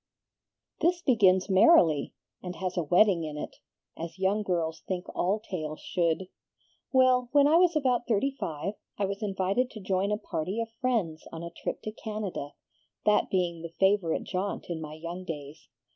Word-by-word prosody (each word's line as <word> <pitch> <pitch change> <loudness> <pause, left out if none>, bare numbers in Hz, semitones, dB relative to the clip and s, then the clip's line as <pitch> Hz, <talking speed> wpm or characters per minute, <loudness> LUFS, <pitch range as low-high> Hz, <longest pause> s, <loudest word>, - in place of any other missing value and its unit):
"This 345 0 +1
begins 195 -8 +4
merrily, 185 - +5 0.3
and 180 -1 -6
has 185 -1 -3
a 175 - +1
wedding 175 +2 +4
in 150 -1 -5
it, - - -6 0.4
as 165 +2 -7
young 195 +3 +1
girls 170 -5 -1
think 185 -1 -3
all 195 +4 +1
tales 155 -7 -5
should. 175 +1 0 0.6
Well, 255 -2 +4
when 285 -1 +6
I 315 +3 +5
was 350 -1 +4
about 255 -5 +1
thirty 240 +5 +2
five, 190 - -4 0.2
I 200 - +1
was 200 +2 -4
invited 200 +4 0
to 220 - -9
join 190 +1 0
a 210 - +1
party 185 +2 -3
of 230 0 -3
friends 215 -12 -1
on 165 0 -7
a 170 - -6
trip - - -5
to 215 - -4
Canada, 210 -9 -5 0.5
that 210 0 +3
being 175 -3 0
the 170 - -6
favorite 190 -4 +2
jaunt 190 -1 -3
in 160 -2 -3
my 155 -1 -7
young 170 +3 -6
days. 150 -3 -8
190 Hz, 175 wpm, -28 LUFS, 170-215 Hz, 0.6 s, when